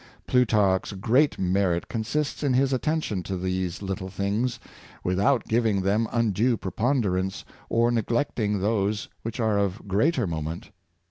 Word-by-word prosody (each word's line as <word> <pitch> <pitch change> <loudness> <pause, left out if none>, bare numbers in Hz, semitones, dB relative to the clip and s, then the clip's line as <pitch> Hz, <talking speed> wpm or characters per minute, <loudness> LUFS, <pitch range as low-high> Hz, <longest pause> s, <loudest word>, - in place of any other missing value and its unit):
Plutarch's 105 -6 +2
great 125 +10 +2
merit 90 -2 +1
consists 140 +6 -2
in 140 -4 +1
his 135 +1 +2
attention 140 - -1
to 95 +1 -4
these 90 0 -2
little 95 0 -4
things, 105 +6 -1 0.4
without 100 +8 +2
giving 110 -4 +1
them 105 +4 +2
undue 115 +1 +2
preponderance, 95 -3 -1 0.2
or 115 +1 +3
neglecting 115 -3 0
those 105 +1 0
which 115 +2 -5
are 110 -3 +2
of 100 +1 -2
greater 120 - +2
moment. 80 +3 -4
105 Hz, 130 wpm, -26 LUFS, 95-120 Hz, 0.4 s, or